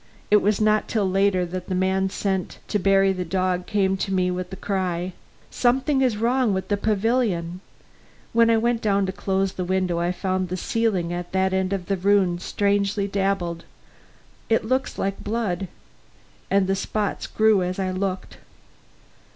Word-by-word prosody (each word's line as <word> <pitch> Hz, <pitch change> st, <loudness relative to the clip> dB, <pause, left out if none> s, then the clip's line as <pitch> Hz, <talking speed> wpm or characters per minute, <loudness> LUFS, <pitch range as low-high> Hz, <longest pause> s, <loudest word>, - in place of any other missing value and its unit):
It 210 Hz, -, +8 dB
was 205 Hz, +1 st, +1 dB
not 215 Hz, 0 st, +2 dB
till 210 Hz, -4 st, 0 dB
later 190 Hz, -1 st, +2 dB
that 180 Hz, +1 st, -6 dB
the 185 Hz, -, -2 dB
man 190 Hz, +1 st, +1 dB
sent 190 Hz, -1 st, -2 dB
to 210 Hz, -, +1 dB
bury 195 Hz, 0 st, +3 dB
the 185 Hz, -1 st, -3 dB
dog 180 Hz, 0 st, -1 dB
came 195 Hz, -2 st, +1 dB
to 195 Hz, -, -3 dB
me 185 Hz, -1 st, +1 dB
with 180 Hz, 0 st, -4 dB
the 190 Hz, -, -7 dB
cry, 185 Hz, -2 st, -2 dB, 0.4 s
"Something 265 Hz, +3 st, +2 dB
is 250 Hz, -5 st, +2 dB
wrong 235 Hz, -1 st, +2 dB
with 190 Hz, -, -4 dB
the 205 Hz, -, +2 dB
pavilion! 205 Hz, -4 st, 0 dB, 0.7 s
When 230 Hz, 0 st, +5 dB
I 230 Hz, -, +4 dB
went 235 Hz, +1 st, 0 dB
in 200 Hz, -2 st, +2 dB
to 190 Hz, -, -2 dB
close 190 Hz, 0 st, -1 dB
the 185 Hz, -, -3 dB
window 180 Hz, -1 st, 0 dB
I 175 Hz, +1 st, 0 dB
found 185 Hz, 0 st, -2 dB
the 185 Hz, -, -3 dB
ceiling 190 Hz, -5 st, 0 dB
at 175 Hz, +1 st, -5 dB
that 190 Hz, 0 st, +1 dB
end 190 Hz, 0 st, 0 dB
of 195 Hz, -3 st, -2 dB
the 195 Hz, +1 st, -1 dB
room 185 Hz, -2 st, +2 dB
strangely 200 Hz, +1 st, 0 dB
dabbled. 195 Hz, -4 st, -1 dB, 0.9 s
It 225 Hz, -1 st, +2 dB
looks 260 Hz, +3 st, -1 dB
like 195 Hz, 0 st, -2 dB
blood. 205 Hz, -4 st, -2 dB, 0.8 s
And 195 Hz, -1 st, +3 dB
the 190 Hz, -, +1 dB
spots 205 Hz, +1 st, -2 dB
grew 220 Hz, -3 st, +3 dB
as 180 Hz, 0 st, -2 dB
I 190 Hz, -1 st, -1 dB
looked." 185 Hz, 0 st, -4 dB
195 Hz, 175 wpm, -23 LUFS, 185-210 Hz, 0.9 s, It